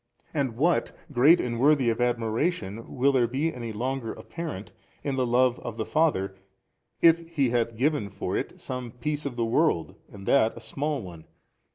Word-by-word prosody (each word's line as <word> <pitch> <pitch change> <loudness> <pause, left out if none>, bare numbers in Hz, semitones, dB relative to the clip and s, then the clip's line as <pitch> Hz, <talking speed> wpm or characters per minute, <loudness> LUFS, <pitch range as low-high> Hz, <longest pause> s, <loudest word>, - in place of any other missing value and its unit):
and 135 -7 -1
what 170 +6 +2 0.2
great 145 +6 +6
and 120 -1 -2
worthy 140 -1 +4
of 115 - -3
admiration 115 - -1
will 135 +3 +4
there 125 -3 +3
be 145 +7 -1
any 120 -2 -5
longer 125 +2 -3
apparent 160 - -7 0.3
in 140 -2 -1
the 130 -2 +1
Love 125 +1 +3
of 115 -2 -6
the 110 - -2
Father 120 -12 +1 0.7
if 165 0 +7
He 140 -7 +1
hath 115 -2 0
given 140 -5 +1
for 100 - -4
it - - -3
some 125 -2 -4
piece 150 +3 -2
of 130 - -6
the 120 -1 0
world 115 - +1 0.2
and 100 -1 -10
that 115 -3 +3
a - - -6
small 135 +4 -2
one? 85 -4 -10
125 Hz, 180 wpm, -27 LUFS, 115-145 Hz, 0.7 s, if